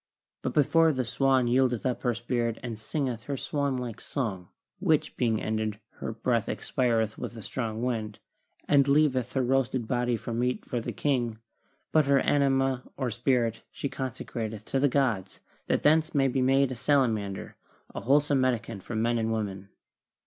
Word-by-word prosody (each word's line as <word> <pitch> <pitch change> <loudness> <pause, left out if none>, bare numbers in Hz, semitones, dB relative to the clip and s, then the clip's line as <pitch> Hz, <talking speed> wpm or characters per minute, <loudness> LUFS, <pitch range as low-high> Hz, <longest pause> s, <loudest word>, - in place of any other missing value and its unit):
But 125 - -3
before 160 +2 +5
the 130 -3 -1
swan 130 +1 +2
yieldeth 125 -1 +2
up 125 -1 -1
her 120 -3 +1
spirit 120 -1 -1
she 120 -2 -3
singeth 115 +1 -3
her 140 -1 -3
swan 140 -1 -1
like 120 -2 -5
song, 100 -10 -3 0.3
which - - +1
being 115 -3 +1
ended, 110 -1 -2 0.2
her - - -3
breath 115 0 0
expireth 115 -4 0
with 120 - -6
a 110 - -8
strong 115 -1 -3
wind, 110 -4 -2 0.5
and 140 -1 +5
leav 145 -1 +4
eth 125 -1 -2
her 130 - +1
roasted 130 -2 +1
body 120 -1 +1
for 115 - -6
meat 125 +2 -1
for 120 - -2
the - - -4
king, 120 -6 0 0.5
but 155 -2 +4
her 140 0 +5
anima 135 -2 +2 0.2
or 130 -4 -1
spirit 120 -1 +1
she 140 - -4
consecrateth 115 -5 -5
to 135 - 0
the 140 +1 +3
gods 115 -9 0 0.3
that - - +1
thence 160 +2 +3
may 135 -1 +4
be 130 0 0
made 135 +1 +3
a - - -3
salamander, 115 -7 0 0.4
a - - -5
wholesome 140 +1 +3
medicament 115 -5 -1
for 115 - -6
men 115 +2 +1
and 110 0 0
women." 100 -3 -3
125 Hz, 175 wpm, -28 LUFS, 115-135 Hz, 0.5 s, before